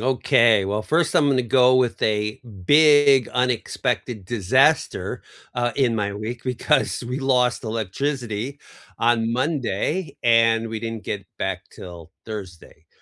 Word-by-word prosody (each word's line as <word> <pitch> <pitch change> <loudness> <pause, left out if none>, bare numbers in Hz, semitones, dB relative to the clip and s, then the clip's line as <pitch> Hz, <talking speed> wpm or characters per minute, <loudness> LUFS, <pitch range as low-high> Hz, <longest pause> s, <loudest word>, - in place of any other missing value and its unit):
Okay. 115 -4 +3
Well, 100 +2 -2
first, 160 +6 0
I'm 145 - +4
gonna 130 -2 +2
go 125 +2 +4
with 125 -2 0
a 105 0 -1 0.2
big 145 - +5
unexpected 125 -2 -2
disaster, 130 - +1 0.3
uh, 120 -1 -1
in 125 -4 +1
my 100 -2 -2
week 110 +4 -6
because 130 +1 0
we 125 +2 -4
lost 125 -3 +1
electricity 115 +3 -4 0.4
on 115 -1 +1
Monday, 140 - -2
and 115 -1 +3
we 110 -1 -5
didn't 115 -1 -6
get 100 -2 -5
back - - -3
till 85 -2 -11
Thursday. 95 -7 -10
120 Hz, 130 wpm, -22 LUFS, 110-130 Hz, 0.4 s, big